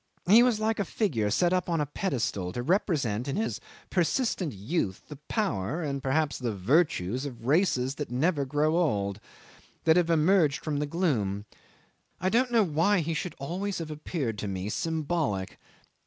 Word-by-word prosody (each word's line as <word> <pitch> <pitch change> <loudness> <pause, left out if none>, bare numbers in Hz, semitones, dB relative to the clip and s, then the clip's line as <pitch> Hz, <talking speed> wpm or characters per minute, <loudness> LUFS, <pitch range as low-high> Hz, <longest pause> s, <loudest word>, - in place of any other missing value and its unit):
He 215 +6 +8
was 240 -3 +3
like 220 0 0
a - - +2
figure 145 - 0
set 175 - +2
up 180 -1 0
on 165 -2 +1
a 150 - +1
pedestal, 125 - -2
to 120 - -3
represent 140 - 0
in 135 - -2
his 225 - -2 0.3
persistent 180 - 0
youth 100 - -2
the 150 - -8
power, 170 - -1
and 140 -2 -2
perhaps 145 +2 0
the 120 -5 -2
virtues, 125 - +1
of 125 -5 -7
races 135 -4 +2
that 145 - -3
never 145 +5 +1
grow 150 +4 +1
old, 100 - 0 0.6
that 160 +1 +5
have 175 -1 +2
emerged 160 -2 +3
from 150 -2 -2
the 150 0 -1
gloom. 115 - 0 0.7
I 185 - +1
don't 245 +5 +2
know 230 -2 +5
why 175 +3 +2
he 165 +1 -2
should 175 +3 -4
always 185 +8 -3
have 160 -2 -5
appeared 145 - -3
to 105 - -3
me 95 +1 -3
symbolic. 155 - -2
155 Hz, 170 wpm, -28 LUFS, 125-180 Hz, 0.7 s, He